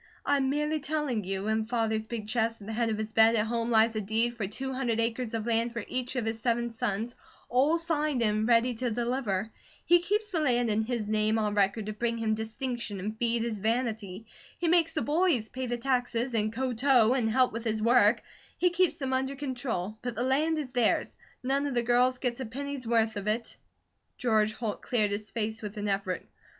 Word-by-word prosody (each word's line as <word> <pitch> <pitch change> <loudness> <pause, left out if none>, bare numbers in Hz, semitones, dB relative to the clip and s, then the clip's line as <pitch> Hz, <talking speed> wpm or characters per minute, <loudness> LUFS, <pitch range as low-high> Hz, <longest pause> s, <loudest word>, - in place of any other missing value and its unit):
"I'm 275 -2 +2
merely 300 +2 0
telling 280 -7 -1
you. 195 +1 -3
In 220 0 0
Father's 220 -2 0
big 220 -3 -5
chest 225 0 0
at 200 - -11
the 220 - -5
head 230 +1 +1
of 215 - -1
his 220 0 -4
bed 225 +1 +6
at 210 -1 +2
home 230 +1 -1
lies 225 0 +4
a 215 - 0
deed 225 +4 0
for 215 -4 -3
two 265 +6 -4
hundred 245 -4 -1
acres 230 0 -1
of 220 -1 -3
land 230 0 +1
for 230 -3 -4
each 255 0 -3
of 245 -3 -1
his 225 0 -2
seven 235 0 0
sons, 225 +1 -2 0.4
all 275 +7 +3
signed 305 -6 0
and 215 0 +1
ready 240 +1 +4
to 245 +2 -2
deliver. 230 -3 -1 0.3
He 350 0 +6
keeps 415 +4 -1
the 330 -4 +1
land 245 -5 +2
in 210 +1 +2
his 235 -3 -2
name 215 +1 +1
on 210 -1 0
record 205 +1 +1
to 215 - -4
bring 230 +2 -1
him 225 -1 0
distinction 220 -1 -4
and 210 +4 -4
feed 235 -1 +1
his 225 -3 -3
vanity. 220 -2 -2 0.3
He 345 - -1
makes 330 -1 +3
the 310 - -1
boys 295 -8 +1
pay 260 0 -4
the 240 0 -1
taxes, 245 -1 0
and 215 -1 +1
ko 255 +2 -2
tow, 245 -1 +4
and 240 -4 +1
help 255 +3 +3
with 230 0 -4
his 220 -2 -1
work; 235 -1 +4 0.3
he 360 0 +3
keeps 350 -3 +2
them 265 -4 -2
under 265 +1 0
control; 245 -7 -3
but 245 -2 -4
the 240 - -1
land 300 +5 +2
is 285 -5 -4
theirs; 245 -3 +1 0.3
none 275 +2 +1
of 275 - -3
the 240 - +2
girls 250 +2 +3
get 250 -1 -2
a 260 - -3
penny's 275 +1 -5
worth 225 -2 +2
of 200 0 -5
it!" 225 +2 -1 0.6
George 215 -3 +2
Holt 220 -4 -4
cleared 215 -4 +1
his 210 +1 -3
face 220 -1 -3
with 210 0 -7
an 205 0 -2
effort. 195 -2 -2
235 Hz, 220 wpm, -29 LUFS, 220-260 Hz, 0.6 s, bed